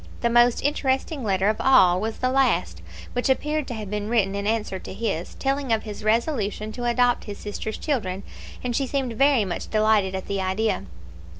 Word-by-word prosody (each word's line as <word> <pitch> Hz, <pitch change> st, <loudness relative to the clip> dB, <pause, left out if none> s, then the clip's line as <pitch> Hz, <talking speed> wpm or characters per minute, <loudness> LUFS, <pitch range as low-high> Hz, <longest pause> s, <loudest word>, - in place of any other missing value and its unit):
The 235 Hz, -, +1 dB
most 240 Hz, 0 st, +4 dB
interesting 275 Hz, 0 st, 0 dB
letter 195 Hz, -2 st, +1 dB
of 215 Hz, 0 st, +2 dB
all 185 Hz, -9 st, +5 dB
was 220 Hz, +1 st, -3 dB
the 255 Hz, 0 st, 0 dB
last, 270 Hz, 0 st, +1 dB, 0.3 s
which 245 Hz, +2 st, 0 dB
appeared 300 Hz, +2 st, 0 dB
to 240 Hz, -, -4 dB
have 210 Hz, -3 st, -6 dB
been 210 Hz, 0 st, -3 dB
written 210 Hz, -5 st, +2 dB
in 200 Hz, 0 st, -2 dB
answer 215 Hz, -4 st, -1 dB
to -, -, -8 dB
his, 195 Hz, -6 st, -3 dB
telling 275 Hz, -1 st, -1 dB
of 220 Hz, -1 st, +2 dB
his 210 Hz, -1 st, -7 dB
resolution 215 Hz, -2 st, 0 dB
to 240 Hz, +2 st, -5 dB
adopt 245 Hz, 0 st, +2 dB
his 205 Hz, -2 st, -7 dB
sister's 210 Hz, +1 st, -5 dB
children; 200 Hz, -10 st, -2 dB, 0.4 s
and 245 Hz, -1 st, -2 dB
she 270 Hz, +1 st, 0 dB
seemed 265 Hz, -3 st, -2 dB
very 275 Hz, -2 st, +3 dB
much 180 Hz, -, -4 dB
delighted 215 Hz, -3 st, +2 dB
at 190 Hz, -, -4 dB
the 200 Hz, -1 st, -2 dB
idea. 190 Hz, -, -1 dB
220 Hz, 195 wpm, -24 LUFS, 205-255 Hz, 0.4 s, all